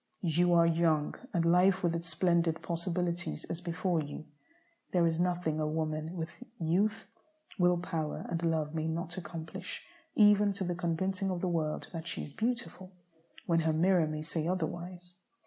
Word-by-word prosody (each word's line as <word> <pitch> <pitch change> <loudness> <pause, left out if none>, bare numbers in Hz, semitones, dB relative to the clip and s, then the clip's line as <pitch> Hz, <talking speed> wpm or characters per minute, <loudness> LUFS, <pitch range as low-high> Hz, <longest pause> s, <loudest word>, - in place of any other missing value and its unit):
You 175 +2 +3
are 170 0 +6
young, 160 -2 +2 0.2
and 170 -1 +1
life 180 +2 +4
with 170 -1 +2
its 170 0 -3
splendid 170 0 +2
possibilities 175 0 -2
is 170 - -4
before 170 -1 0
you. 145 +1 -7 0.7
There 175 -2 +4
is 165 0 +1
nothing 175 -3 0
a 155 - 0
woman 155 +1 -2
with 165 -1 -3 0.3
youth, 195 +7 +1 0.5
will 180 0 +4
power, 165 -3 -3
and 170 0 -2
love 160 -2 0
may 160 0 -1
not 170 +2 -3
accomplish 165 -2 -7 0.3
even 205 -1 +6
to 195 0 -3
the 175 -1 -1
convincing 190 +3 -1
of 180 -2 -2
the 185 - 0
world 155 -3 -1
that 165 0 -5
she - - -3
is 145 - -9
beautiful, 225 - -2 0.5
when 170 -1 +3
her 160 -1 +2
mirror 175 0 +4
may 155 0 -3
say 160 0 -2
otherwise. 175 0 -3
170 Hz, 165 wpm, -32 LUFS, 160-180 Hz, 0.7 s, are